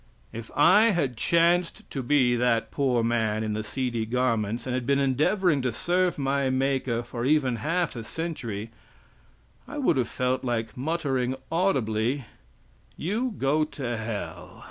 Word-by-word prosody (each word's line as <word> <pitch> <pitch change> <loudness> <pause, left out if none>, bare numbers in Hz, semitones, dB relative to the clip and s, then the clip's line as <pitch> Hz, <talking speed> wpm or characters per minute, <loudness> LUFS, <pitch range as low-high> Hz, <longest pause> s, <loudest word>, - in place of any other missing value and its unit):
If 115 0 -7
I 205 +9 +6
had 145 - 0
chanced 170 +6 +2
to 135 - -3
be 125 -1 +3
that 120 -1 +1
poor 130 -5 +1
man 110 -2 0
in 110 -1 -2
the 110 +1 -2
seedy 120 -2 -2
garments, 115 -2 0
and 130 - -2
had 125 -1 -2
been 140 0 +3
endeavoring 145 +4 +2
to 125 -1 0
serve 180 +8 0
my 140 -1 0
Maker 130 -2 0
for 120 0 -5
even 135 -3 +2
half 165 +4 -1
a 115 - -5
century, 115 -9 -5 1.0
I - - -7
would - - +2
have 125 -3 0
felt 125 0 -1
like 115 -3 -2
muttering 135 -3 -1 0.2
audibly, 130 - 0 0.7
"You 220 +7 -2
go 145 +3 +2
to 135 -5 -4
hell!" 110 -1 -6
130 Hz, 150 wpm, -26 LUFS, 115-150 Hz, 1.0 s, I